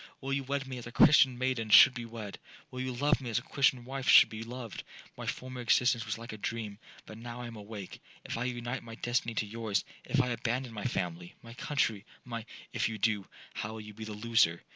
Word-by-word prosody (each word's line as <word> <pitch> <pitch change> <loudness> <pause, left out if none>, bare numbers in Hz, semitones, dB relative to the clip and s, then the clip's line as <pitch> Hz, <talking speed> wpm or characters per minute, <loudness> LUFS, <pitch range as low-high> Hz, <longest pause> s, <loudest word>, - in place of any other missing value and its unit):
Will 135 0 -3
you 140 0 0
wed 140 +1 -2
me 130 -2 -6
as 120 - -8
a - - -8
Christian 135 -1 +6
maiden 125 -3 -1
should 130 - +9
be 120 -2 -5
wed?—Will 115 +2 -10
you 130 0 -2
love 145 +4 +2
me 125 - -5
as 110 - 0
a - - -1
Christian 135 -3 +2
wife 135 0 -3
should - - +9
be 110 0 -7
loved? 115 -1 -7 0.3
My - - -7
former 130 -1 -4
existence 120 -1 +3
was 105 - -2
like 115 -1 -8
a 110 - -8
dream,—but 110 0 -6
now 120 +1 -7
I - - -5
am 120 -1 -8
awake. 105 -2 -8 0.2
If - - -4
I 115 +2 -2
unite 120 0 -3
my 115 -1 -9
destiny 120 -1 -1
to 110 - 0
yours,—if 115 +5 -2
I 125 -1 +2
abandon 120 +1 -2
my 105 +1 -5
family, 90 -7 -3
my 115 0 -10
country, 115 -5 0 0.2
my'—'If 115 -2 -4
you 110 - -4
do, 105 -2 +1 0.3
how 105 +2 -4
will 110 - -6
you 105 0 -10
be 110 +1 -8
the 110 - -6
loser? 105 -6 +2
115 Hz, 220 wpm, -31 LUFS, 110-125 Hz, 0.3 s, should